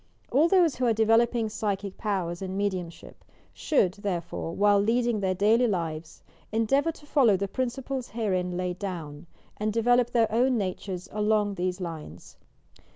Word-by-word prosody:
All 295 +6 +4
those 345 -5 +3
who 250 -1 +1
are 230 - +3
developing 225 +1 +3
psy 215 -2 -1
chic 200 -2 -7
powers 185 -5 -2
and 190 0 -4
mediumship 185 -4 -4 0.3
should, 195 - +1
therefore, 175 -5 -4
while 205 0 +4
leading 235 +2 +1
their 190 -2 0
daily 220 +6 +3
lives, 165 -5 -4 0.3
endeavour 270 +8 +2
to 295 - -16
follow 255 -9 +4
the 200 +1 -2
prin 255 +6 -1
ciples 260 0 -5
herein 185 -5 -1
laid 180 0 -3
down, 170 -5 -6 0.3
and 215 +1 -1
develop 240 +2 +3
their 230 -3 +2
own 250 +3 +2
natures 190 -2 -4
along 210 -1 +1
these 180 0 -2
lines. 160 - -8
205 Hz, 155 wpm, -27 LUFS, 185-235 Hz, 0.3 s, All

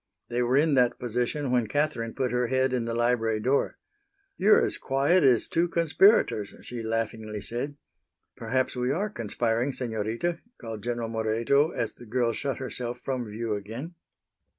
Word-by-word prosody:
They 120 +1 0
were 125 +2 +2
in 155 +1 +3
that 125 -2 +3
position 125 +3 -2
when 120 -3 +2
Catherine 145 -6 -1
put 130 -3 -1
her 125 0 +1
head 130 +1 +1
in 120 -2 0
the 115 0 -2
library 115 -2 +1
door. 130 +6 +1 0.6
"You're 210 +3 +5
as - - -3
quiet 140 +6 +2
as 125 -5 +4
two 170 +1 +1
conspirators," 170 - +3
she 120 -1 -6
laughingly 110 -1 -3
said. 125 +7 -4 0.6
"Perhaps 130 +4 -1
we 125 0 -1
are 200 +8 -1
conspiring, 115 - -1
Senorita," 115 +8 -2 0.2
called 115 -2 -6
General 120 0 -2
Moreto 115 +6 +2
as - - -3
the 120 - -14
girl 120 +1 +1
shut 135 +3 -2
herself 125 -2 -4
from 125 -4 -2
view 110 +1 -3
again. 115 - -6
125 Hz, 160 wpm, -27 LUFS, 115-135 Hz, 0.6 s, You're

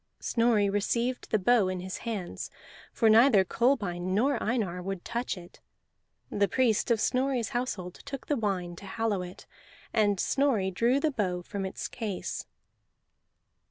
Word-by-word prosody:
Snorri 230 -3 +2
received 235 +5 -1
the 215 - +3
bow 215 0 +4
in 185 0 -2
his 185 +1 -5
hands, 195 -6 -4 0.4
for 225 - +2
neither 220 -2 +6
Kolbein 190 -6 0
nor 265 +7 +2
Einar 210 -7 -1
would 190 -1 -5
touch 235 -3 -2
it. 175 -1 -13 0.7
The 200 0 +2
priest 245 -3 +2
of 230 -2 +3
Snorri's 255 0 +1
household 210 -8 -3
took 275 -1 -7
the 295 - +1
wine, 190 -7 -2
to 200 - -10
hallow 215 -2 -1
it; 180 0 -9 0.5
and 205 -4 +2
Snorri 250 -9 +1
drew 235 +8 +2
the 310 +1 +1
bow 185 -8 -1
from 195 +1 -4
its - - -5
case. 210 -5 -4
210 Hz, 150 wpm, -29 LUFS, 190-240 Hz, 0.7 s, neither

